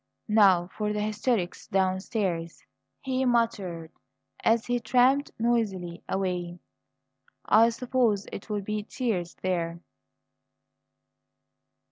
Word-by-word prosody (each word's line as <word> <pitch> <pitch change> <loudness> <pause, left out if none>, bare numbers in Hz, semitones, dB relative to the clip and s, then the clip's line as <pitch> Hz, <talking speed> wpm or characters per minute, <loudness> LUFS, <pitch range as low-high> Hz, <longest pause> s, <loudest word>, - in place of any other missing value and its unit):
"Now 195 -5 +5
for 210 -1 -1
the 210 - -2
hysterics 210 -2 -1
downstairs," 185 -2 -1 0.4
he 260 0 -1
muttered 210 -10 0 0.5
as 230 0 +3
he 245 0 0
tramped 255 +4 +3
noisily 205 -7 -1
away. 180 -2 -2 0.9
"I 225 +3 +6
suppose 235 -3 0
it'll 205 +1 -4
be 210 +2 -3
tears 205 -6 -3
there!" 170 -2 -1
210 Hz, 90 wpm, -27 LUFS, 180-235 Hz, 0.9 s, I